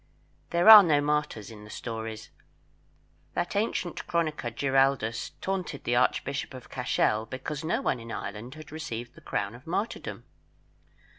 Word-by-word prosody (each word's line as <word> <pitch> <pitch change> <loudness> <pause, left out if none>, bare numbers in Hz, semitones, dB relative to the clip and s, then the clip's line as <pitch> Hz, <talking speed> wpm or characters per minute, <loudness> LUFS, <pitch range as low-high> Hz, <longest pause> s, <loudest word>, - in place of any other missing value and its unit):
There 170 +3 +2
are 220 -1 +13
no 155 -6 +3
martyrs 145 -7 -1
in 105 -1 -11
the 105 - -12
stories. 110 -1 -6 1.0
That 175 - -2
ancient 200 -4 -1
chronicler 155 -7 -1
Giraldus 135 -2 +1
taunted 185 -7 -3
the 120 - +1
Archbishop 135 +2 0
of 130 - -11
Cashel 115 -3 +1
because 140 +5 -5
no 160 - 0
one 130 - 0
in 115 0 -9
Ireland 105 +7 -6
had 155 -1 -11
received 120 -7 -6
the - - -16
crown 100 +1 -2
of 125 +5 -14
martyrdom. 200 +7 -3
135 Hz, 145 wpm, -28 LUFS, 115-160 Hz, 1.0 s, are